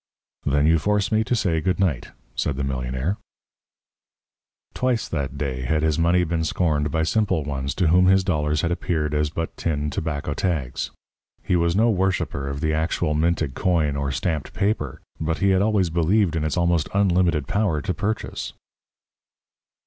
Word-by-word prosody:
"Then 70 +1 +3
you 80 +1 +4
force 105 +3 +1
me 110 0 +3
to 125 - +1
say 85 -8 +1
good 90 +2 0
night," 85 -11 0 0.3
said 70 - -1
the 70 - -1
millionaire. 65 +7 -2 1.6
Twice 125 -3 0
that 70 -3 -3
day 65 -3 -2
had 75 +5 0
his 80 0 +1
money 85 +2 +3
been 80 -1 -1
scorned 80 -3 0
by 80 +1 0
simple 95 -2 +1
ones 70 -1 -3
to 90 -4 +2
whom 90 +2 +5
his 95 0 +5
dollars 75 -3 0
had 85 - 0
appeared 80 -4 -1
as 75 0 +1
but 80 +2 -4
tin 75 -3 -1
tobacco 75 -1 -3
tags. 75 -9 -2 0.5
He 90 - +1
was 85 0 +2
no 115 +3 +4
worshipper 90 -8 -1
of 70 +1 -4
the 80 -1 +1
actual 80 0 0
minted 80 -2 0
coin 80 -5 +1
or 70 -1 -1
stamped 75 +4 -2
paper, 95 - -1 0.2
but 80 +1 -1
he 100 - +2
had 95 0 +3
always 100 -5 +2
believed 85 +2 +2
in 80 - 0
its 80 +3 -1
almost 85 -3 +1
unlimited 90 -7 +2
power 100 -7 +1
to 90 - -1
purchase. 100 +5 -3
80 Hz, 170 wpm, -23 LUFS, 75-95 Hz, 1.6 s, whom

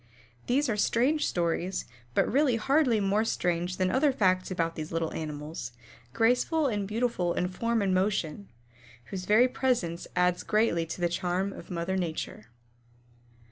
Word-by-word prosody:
These 280 +4 +2
are 225 - 0
strange 260 +8 +2
stories, 175 +2 -1 0.3
but - - +4
really 275 -3 +3
hardly 255 0 +2
more 200 +2 +2
strange 175 -4 -1
than 185 -1 +1
other 280 +2 +3
facts 185 -7 +1
about 165 -3 -1
these 155 0 -6
little 165 -1 -2
animals, 150 -4 -5 0.4
graceful 250 - +2
and 205 -6 -1
beautiful 215 -5 0
in 180 - 0
form 230 +3 0
and 190 -1 +1
motion, 190 -1 -1 0.6
whose 185 -1 -4
very 220 +5 +5
presence 245 -10 -1
adds 180 0 +2
greatly 210 -6 +1
to 170 - -6
the 175 - +3
charm 180 +3 -1
of - - -11
mother 180 +1 -2
Nature. 160 - -4
190 Hz, 150 wpm, -28 LUFS, 175-230 Hz, 0.6 s, very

